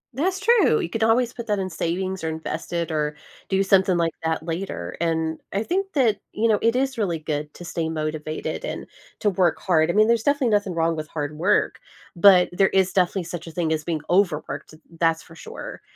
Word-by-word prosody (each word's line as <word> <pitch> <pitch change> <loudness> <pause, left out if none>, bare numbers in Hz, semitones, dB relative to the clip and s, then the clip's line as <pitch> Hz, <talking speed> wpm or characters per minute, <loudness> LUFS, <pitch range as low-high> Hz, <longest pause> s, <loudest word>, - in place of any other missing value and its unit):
That's 370 +7 0
true, 415 - +4
you 165 - -2
could 225 - -4
always 230 +2 +3
put 235 -1 -7
that 210 -1 +1
in 190 -1 -3
savings 185 +2 -2
or 160 - -1
invest 160 0 -5
it 170 -1 -1
or 150 -1 -1 0.3
do 195 0 +2
something 190 -1 +4
like 165 -2 +1
that 160 0 -1
later, 165 - -4
and 160 -1 0
I 200 +2 -1
think 390 - -2
that, 235 -8 +3 0.2
you 225 +2 +1
know, 215 -2 +3
it 230 +1 +2
is 265 -1 0
really 180 -6 0
good 150 -1 -4
to 175 - -9
stay 165 -2 -2
motivated 155 - -4
and - - -5 0.4
to 205 - +2
work 180 -3 +2
hard. 160 -4 +2
I - - +1
mean, 215 +1 +5
there's 235 -1 +3
definitely 285 -1 +2
nothing 205 -4 +1
wrong 165 0 +1
with 155 -1 -5
hard 150 -1 -4
work, 200 +5 +2 0.4
but 180 0 +7
there 190 +2 +3
is 190 -1 +2
definitely 185 0 +1
such 170 0 -7
a - - -7
thing 160 -1 0
as 155 -1 -2
being 160 -2 -2
overworked, 175 -5 0
th 155 +1 -16 0.2
that's 165 -1 +2
for - - -16
sure. 165 - -9
175 Hz, 220 wpm, -23 LUFS, 160-210 Hz, 0.4 s, but